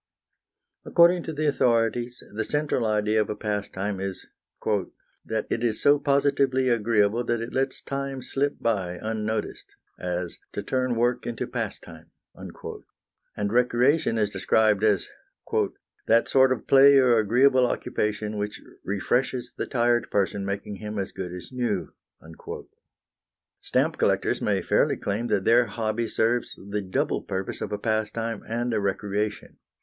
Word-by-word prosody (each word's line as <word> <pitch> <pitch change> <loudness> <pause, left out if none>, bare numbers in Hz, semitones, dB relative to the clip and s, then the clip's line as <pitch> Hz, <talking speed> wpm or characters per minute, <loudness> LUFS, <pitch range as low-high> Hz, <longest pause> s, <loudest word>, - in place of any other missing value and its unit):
According 175 +1 +5
to 160 - -4
the 155 +1 -2
authorities, 120 -2 +1
the 110 +1 -1
central 145 -6 0
idea 105 0 +2
of - - -2
a 105 - -2
pastime 105 -1 -3
is 95 0 -5 0.4
"that 110 +1 -3
it 115 - -1
is 115 -3 +1
so 145 0 +5
positively 140 -2 +2
agreeable 115 -1 +2
that 120 -1 0
it 115 +1 -6
lets 135 0 -1
time 135 -1 -4
slip 140 +1 0
by 95 -6 -1
unnoticed; 110 -1 -4 0.2
as, 90 -1 -3
to 105 - -4
turn 130 +2 0
work 120 +2 0
into 120 -1 -3
pastime." - - -6 0.2
And 105 0 -8
recreation 125 +2 +3
is 105 -2 +1
described 105 +2 +2
as 105 -4 +3 1.0
"that 115 +1 +4
sort 130 -1 +5
of 130 - -1
play 140 +1 +7
or 125 -4 +5
agreeable 125 +4 +4
occupation 105 -1 -2
which 105 0 -4 0.2
refreshes 125 +5 -1
the - - -3
tired 120 -2 +1
person, 100 0 0
making 100 +1 -4
him 105 0 -6
as 95 -1 -3
good 90 -2 -6
as 90 -1 -8
new." 125 -2 -2 1.7
Stamp - - 0
collectors - - +1
may - - 0
fairly - - +2
claim 105 +4 -2
that 100 -4 0
their 120 +1 +5
hobby 110 +1 -2
serves 115 +3 0 0.2
the 105 0 -1
double 95 -1 -1
purpose 95 0 -4
of - - -4
a 105 - -1
pastime 110 +1 -2
and 120 +2 -1
a 110 - +1
recreation. 100 +1 -2
115 Hz, 145 wpm, -26 LUFS, 105-125 Hz, 1.7 s, play